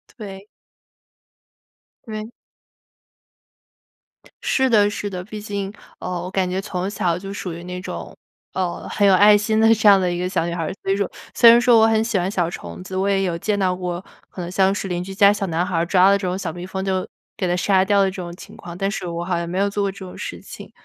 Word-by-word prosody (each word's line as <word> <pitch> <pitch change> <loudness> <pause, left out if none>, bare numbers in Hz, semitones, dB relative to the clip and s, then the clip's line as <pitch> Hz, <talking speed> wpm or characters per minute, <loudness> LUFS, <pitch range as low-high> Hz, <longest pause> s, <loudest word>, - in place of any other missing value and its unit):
对。 200 -3 -9 1.6
对。 215 0 -6 2.1
是 265 -1 +2
的 205 -3 +5
是 205 0 -4
的， 180 -2 -5
毕 210 +2 -8
竟， 200 -1 -4 0.3
呃， - - -6
我 180 - -6
感 190 -1 0
觉 185 +1 -1
从 185 -1 -3
小 180 -4 -1
就 195 +1 -7
属 190 -3 -5
于 170 +1 -8
那 180 0 -6
种， 185 - -7 0.4
呃， 185 -2 -3
很 205 - +2
有 195 - +6
爱 205 +3 +7
心 215 +1 0
的 225 0 +6
这 220 -1 +3
样 200 -1 +7
的 180 -1 +1
一 175 - -2
个 180 +1 -1
小 175 -3 -1
女 170 - -3
孩 170 - -3
儿。 155 - -2
所 195 - 0
以 - - +1
说 200 -1 -1 0.2
虽 235 - +8
然 235 +1 +7
说 240 -1 +5
我 220 - +6
很 220 -1 +3
喜 225 -3 0
欢 180 +1 -1
小 175 -4 0
虫 85 - -8
子， 185 - -8
我 190 +1 +1
也 195 -1 +2
有 175 -3 -1
见 205 +4 -1
到 185 -2 +1
过， 180 -1 -4 0.3
可 - - -9
能 175 0 -5
像 190 +1 +3
是 200 - -4
邻 175 -1 -2
居 190 +1 -7
家 200 +1 +6
小 200 -1 -2
男 170 +2 0
孩 185 -2 -2
儿 165 +1 +1
抓 185 +2 +5
的 200 - +5
这 195 - -4
种 180 +1 -2
小 180 -5 -4
蜜 175 +2 -7
蜂 190 0 -4
就 190 -1 -1 0.3
给 185 - -1
它 175 - +1
杀 190 +1 +3
掉 200 0 +3
的 195 - +2
这 190 - -10
种 175 -1 -7
情 - - -12
况， 170 0 -9
但 195 +1 0
是 200 - -4
我 170 0 -4
好 175 0 -1
像 170 0 -3
没 180 +2 -3
有 200 +1 +2
做 205 0 -2
过 200 - 0
这 195 - -12
种 185 -2 -9
事 - - -6
情。 - - -11
190 Hz, 270 characters per minute, -21 LUFS, 180-205 Hz, 2.1 s, 虽